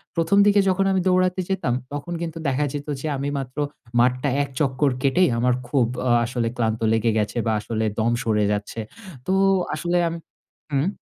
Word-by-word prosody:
১ম 165 Hz, +4 st, +2 dB
দিকে 205 Hz, 0 st, +5 dB
যখন 190 Hz, +1 st, +2 dB
আমি 190 Hz, -1 st, +2 dB
দৌড়াতে 185 Hz, 0 st, +2 dB
যেতাম, 185 Hz, -10 st, 0 dB, 0.2 s
তখন 145 Hz, +4 st, -5 dB
কিন্তু 165 Hz, -1 st, -4 dB
দেখা 140 Hz, +2 st, +1 dB
যেত 145 Hz, 0 st, -5 dB
যে 155 Hz, -, -3 dB
আমি 140 Hz, +1 st, -2 dB
মাত্র 130 Hz, 0 st, -8 dB, 0.4 s
মাঠটা 125 Hz, +3 st, +2 dB
এক 140 Hz, -, -6 dB
চক্কর 140 Hz, 0 st, +1 dB
কেটেই 175 Hz, +7 st, +3 dB
আমার 125 Hz, +1 st, +2 dB
খুব 125 Hz, -2 st, +2 dB, 0.2 s
আ -, -, +2 dB, 0.2 s
আসলে 120 Hz, -1 st, -2 dB
ক্লান্ত 110 Hz, -1 st, 0 dB
লেগে 115 Hz, 0 st, +2 dB
গেছে 105 Hz, +2 st, -1 dB
বা 110 Hz, -, +1 dB
আসলে 110 Hz, +1 st, -2 dB
দম 115 Hz, +2 st, +2 dB
সরে 105 Hz, -3 st, +1 dB
যাচ্ছে। 105 Hz, +2 st, -3 dB, 0.5 s
তো 185 Hz, -, -1 dB, 0.4 s
আসলে 175 Hz, 0 st, 0 dB
আম 165 Hz, -, -3 dB, 0.6 s
হুম? 140 Hz, +4 st, +1 dB
140 Hz, 180 wpm, -23 LUFS, 120-170 Hz, 0.6 s, দিকে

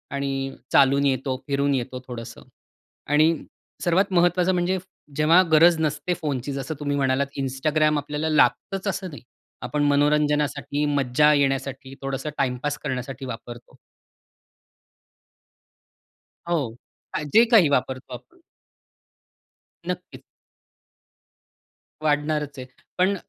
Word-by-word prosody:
आणि 135 Hz, -1 st, -3 dB, 0.2 s
चालून 140 Hz, +1 st, +4 dB
येतो, 130 Hz, -1 st, 0 dB
फिरून 140 Hz, 0 st, +1 dB
येतो 130 Hz, 0 st, -4 dB
थोडंसं. 115 Hz, -2 st, -8 dB, 0.6 s
आणि 155 Hz, +3 st, +4 dB, 0.5 s
सर्वात 185 Hz, +3 st, +2 dB
महत्त्वाचं 175 Hz, +1 st, +3 dB
म्हणजे, 180 Hz, +1 st, 0 dB, 0.4 s
जेव्हा 160 Hz, +4 st, +5 dB
गरज 165 Hz, +2 st, +6 dB
नसते 155 Hz, +3 st, -1 dB
फोनची 140 Hz, -3 st, -3 dB
जसं 135 Hz, +3 st, -4 dB
तुम्ही 145 Hz, -1 st, -1 dB
म्हणालात 140 Hz, +1 st, 0 dB
Instagram 150 Hz, +3 st, +1 dB
आपल्याला 150 Hz, +2 st, -3 dB
लागतंच 190 Hz, +5 st, +1 dB
असं 190 Hz, -1 st, -2 dB
नाही. 145 Hz, -, -10 dB, 0.4 s
आपण 150 Hz, -1 st, -1 dB
मनोरंजनासाठी, 145 Hz, 0 st, +1 dB
मज्जा 145 Hz, 0 st, +3 dB
येण्यासाठी 135 Hz, -1 st, -1 dB
थोडंसं 135 Hz, +2 st, -3 dB
टाईमपास 135 Hz, +3 st, -1 dB
करण्यासाठी 130 Hz, -1 st, -4 dB
वापरतो. 120 Hz, -1 st, -9 dB, 2.7 s
हो, 140 Hz, -10 st, -1 dB, 0.4 s
अ, -, -, -2 dB
जे 230 Hz, +2 st, +7 dB
काही 200 Hz, -10 st, +6 dB
वापरतो 130 Hz, -1 st, -1 dB
आपण. 340 Hz, -, -12 dB, 1.5 s
नक्कीच. -, -, -6 dB, 1.8 s
वाढणारच 150 Hz, -1 st, 0 dB
आहे. 125 Hz, -, -7 dB, 0.3 s
पण 185 Hz, +2 st, +3 dB
145 Hz, 105 wpm, -24 LUFS, 135-155 Hz, 2.7 s, जे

